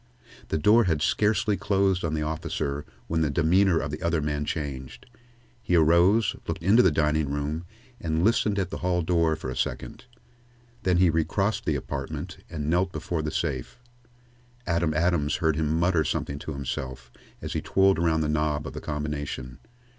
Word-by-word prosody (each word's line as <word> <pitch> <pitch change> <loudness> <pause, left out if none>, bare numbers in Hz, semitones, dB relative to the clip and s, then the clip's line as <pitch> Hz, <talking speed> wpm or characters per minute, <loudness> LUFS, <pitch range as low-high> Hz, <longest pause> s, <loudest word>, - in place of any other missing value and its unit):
The - - -1
door 110 +8 +5
had 80 -4 +1
scarcely 105 +2 +2
closed 95 -1 +1
on 80 -2 -1
the 75 - -1
officer 75 -2 -3 0.2
when 80 0 -1
the 75 - +2
demeanor 85 +5 +3
of 75 -2 -2
the 75 - -6
other 85 -2 +1
man 75 0 -2
changed. 70 -5 -5 0.6
He 90 - 0
arose, 85 +7 +4
looked - - -4
into 105 +7 +6
the 95 - +5
dining 75 -1 +1
room, 75 +4 -3 0.3
and 80 0 -1
listened 105 -1 +2
at 95 - -1
the - - -4
hall 90 -1 0
doorway 80 -2 +2
for 65 - -5
a - - -5
second. - - -4 0.8
Then 90 -1 +2
he 90 -2 +4
recrossed 95 +6 0
the - - +1
apartment - - -5
and 75 -3 -4
knelt 90 +3 +1
before 80 +1 -3
the 75 - -2
safe. 65 -3 -3 0.9
Adam 85 -2 +1
Adams 80 -2 +1
heard 80 -4 +1
him 80 +1 0
mutter 85 -2 +2
something 70 -1 -3
to 80 - -6
himself 65 -2 -5 0.3
as - - -5
he - - -1
twirled 95 -2 +3
around 80 -2 +2
the 75 - 0
knob 75 -1 0
of - - -6
the - - -6
combination. 75 -4 -4
80 Hz, 175 wpm, -26 LUFS, 75-90 Hz, 0.9 s, into